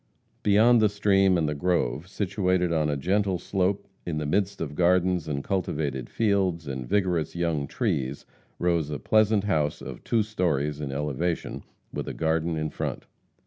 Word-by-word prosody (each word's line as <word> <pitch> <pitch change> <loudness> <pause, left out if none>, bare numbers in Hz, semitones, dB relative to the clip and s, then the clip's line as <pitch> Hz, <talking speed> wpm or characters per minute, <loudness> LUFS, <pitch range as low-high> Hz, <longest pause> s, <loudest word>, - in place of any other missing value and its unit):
Beyond 110 +3 +5
the 105 - +5
stream 95 -2 +3
and 80 -2 +1
the 75 - -1
grove, 85 -1 0
situated 95 -3 0
on 75 -2 +1
a 70 - 0
gentle 95 +5 +1
slope 95 +3 -1 0.2
in 85 -3 -3
the 75 - -2
midst 100 +5 0
of 75 -3 -4
gardens 90 0 +2
and 70 -2 -2
cultivated 75 -9 -2
fields, 95 -7 +1
and 65 -3 -5
vigorous 90 -7 0
young 85 -5 -1
trees, 65 +1 -2 0.3
rose 85 -4 +1
a 75 - -3
pleasant 110 +4 +3
house 75 -8 0
of - - -8
two 115 -2 +2
stories 75 -8 -1
in 70 -2 -3
elevation, 75 +4 -2 0.3
with - - -4
a - - -4
garden 80 +1 0
in 75 -1 -2
front. - - -4
85 Hz, 165 wpm, -26 LUFS, 75-100 Hz, 0.3 s, Beyond